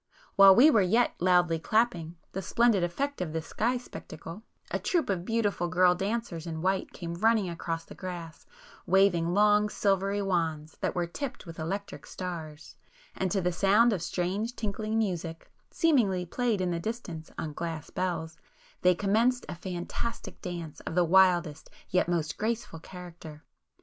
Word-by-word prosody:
While 195 -1 +9
we 285 +8 +7
were 220 - +5
yet 225 +6 +3
loudly 175 -2 +3
clapping 175 -4 0 0.2
the 190 - -4
splendid 225 0 +2
effect 275 +11 -2
of 160 -4 -3
this 160 -1 -3
sky 240 +8 0
spectacle, 165 -6 -9 0.3
a - - 0
troop 330 - 0
of 180 -3 -2
beautiful 205 -6 0
girl 180 0 +4
dancers 195 -3 -3
in 160 0 -5
white 190 0 0
came 170 -1 -6
running 220 +2 +2
across 165 -1 -4
the - - -11
grass, 175 -4 -8 0.4
waving 175 -2 +3
long 210 0 +4
silvery 200 0 0
wands 160 -5 -1
that - - -1
were 175 -1 0
tipped 245 +9 -6
with 165 -1 -9
electric 195 +6 -5
stars, 160 -4 -7 0.4
and 190 - -1
to 195 +1 0
the 180 0 +1
sound 205 +6 +4
of 185 - -2
strange 190 +7 -2
tinkling 215 +1 -2
music, 175 -6 -3 0.2
seemingly 220 - +2
played 230 +1 0
in 180 -1 0
the 170 - -1
distance 175 -6 -5
on 155 -2 -4
glass 165 -2 -5
bells, 165 -4 -3 0.4
they 180 0 +5
commenced 225 +6 +2
a - - -5
fantastic 180 +6 -5
dance 170 -5 -6
of - - -6
the 180 -1 +4
wildest 175 -3 +3 0.2
yet 180 -1 +2
most 160 -4 -1
graceful 215 -6 -2
character. 165 -3 -11
180 Hz, 160 wpm, -29 LUFS, 170-210 Hz, 0.4 s, While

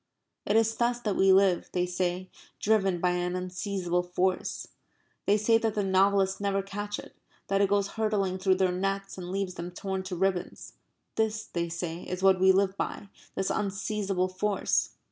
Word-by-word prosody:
It 205 - +2
is 225 0 +3
thus 240 0 +1
that 210 -4 -1
we 190 0 +5
live, 190 -2 +4
they 180 -1 +1
say, 180 +1 -2 0.3
driven 195 -4 +2
by 180 +1 +2
an 180 0 -1
unseizable 185 -1 -2
force. 180 +1 -1 0.6
They 205 - +5
say 225 +2 +3
that 225 -2 -1
the 205 - +1
novelists 195 0 +2
never 195 -1 0
catch 205 +1 -4
it; - - -11 0.3
that 195 0 +2
it 200 - +3
goes 200 0 +2
hurtling 205 -4 -1
through 190 0 +3
their 185 -1 +2
nets 195 +1 -2
and 175 -1 -6
leaves 195 -1 -2
them 175 0 -6
torn 190 +1 -4
to 190 -1 -4
ribbons. 185 0 -2 0.4
This, 220 -1 0
they 170 -1 -3
say, 170 0 -4
is 180 +1 -5
what 190 -1 +5
we 190 +1 +6
live 190 0 +2
by 200 - -4 0.3
this 190 - -1
unseizable 195 -2 -1
force. 195 +2 0
195 Hz, 180 wpm, -28 LUFS, 185-200 Hz, 0.6 s, we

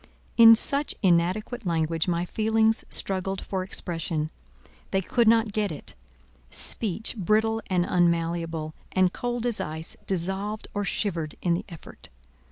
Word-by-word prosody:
In 230 -1 +9
such 280 +5 +1
inadequate 190 +7 +1
language 165 -2 -1
my 175 0 0
feelings 220 +2 +1
struggled 195 0 0
for 190 -1 -4
expression: 165 -4 -2 0.6
they 195 - +1
could 230 +5 +1
not 225 -1 +4
get 205 -2 -1
it; 150 - -9 0.6
speech, 220 - +2
brittle 220 +2 +1
and 180 -3 +1
unmalleable, 165 -2 0 0.2
and 185 -1 +2
cold 245 -1 -3
as 240 -3 -1
ice, 160 +2 -6
dissolved 195 +4 -1
or 205 - -2
shivered 175 -7 -2
in 175 - +2
the 170 - -3
effort. 165 -3 -12
190 Hz, 135 wpm, -26 LUFS, 170-220 Hz, 0.6 s, In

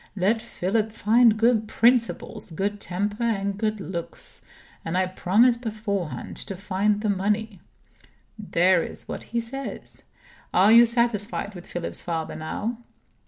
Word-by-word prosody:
'Let 210 +4 +1
Philip 215 +4 -1
find 225 +1 +4
good 225 -1 +3
principles, 230 -2 +1
good 200 +5 -2
temper, 205 +5 -3
and 200 -4 0
good 215 +1 -1
looks; 175 -3 -6 0.4
and 165 +2 -2
I 185 - +3
promise 210 +6 +3
beforehand 210 -7 -4
to 195 - -2
find 205 +2 0
the 215 - 0
money.' 205 +1 -1 0.8
There 185 -3 +3
is - - -5
what - - -6
he 235 - -2
says. 265 +4 -7 0.5
Are 195 +4 +6
you 235 +1 +8
satisfied 230 -3 -1
with 180 -2 -11
Philip's 175 -1 -5
father, 165 -2 -3
now?" 210 +9 -4
210 Hz, 135 wpm, -25 LUFS, 185-230 Hz, 0.8 s, you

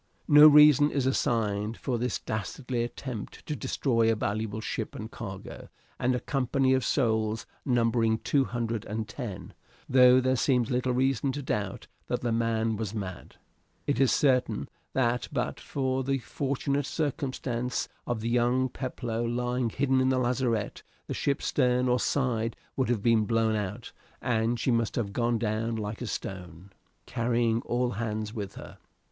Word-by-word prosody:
No 150 0 +9
reason 150 -1 +7
is 140 -3 -1
assigned 110 -4 0
for 125 -4 -2
this 125 +1 -1
dastardly 120 +4 -3
attempt 120 -2 -6
to 150 - -3
destroy 115 -2 +1
a - - +1
valuable 110 +1 -2
ship - - -4
and - - -7
cargo - - -8 0.3
and 125 +1 +2
a - - -1
company 135 0 +1
of 130 -1 +2
souls 110 -4 0 0.2
numbering 115 -3 +2
two 135 +3 +1
hundred 115 -3 -3
and 110 +1 -4
ten, 105 -4 -7 0.3
though 125 0 +7
there 130 0 +2
seems 125 -1 +1
little 125 +1 +1
reason 130 +1 +1
to 145 +1 -4
doubt 100 -6 -3 0.2
that - - -1
the 120 - -1
man 115 -1 0
was 110 0 -4
mad. 95 -4 -6 0.5
It - - 0
is 135 - +4
certain 130 -3 +2 0.3
that 120 -2 +1
but - - -2
for 130 -1 -2
the 135 +1 0
fortunate 140 +2 -2
circumstance 130 -5 -2 0.2
of 115 -2 -2
young 120 +2 +2
Peploe 120 -3 -4
lying 120 +1 -1
hidden 130 +2 +1
in 130 - +3
the 130 - +2
lazarette 120 -4 0 0.2
the - - -4
ship's 140 -1 -1
stern 125 -2 +2
or 125 0 +2
side 115 -4 0 0.2
would 130 -2 0
have 115 -5 0
been 115 -2 +4
blown 115 -1 +1
out, 105 +3 -4 0.3
and 115 -1 0
she 125 - +1
must 115 -2 0
have 100 -4 -2
gone 120 +1 +1
down 115 +1 -1
like 105 +1 -4
a 125 - -3
stone, 90 -2 -6 0.3
carrying 115 -1 +1
all 120 0 0
hands 110 -1 -3
with 105 -4 -5
her. - - -11
120 Hz, 160 wpm, -28 LUFS, 110-130 Hz, 0.5 s, No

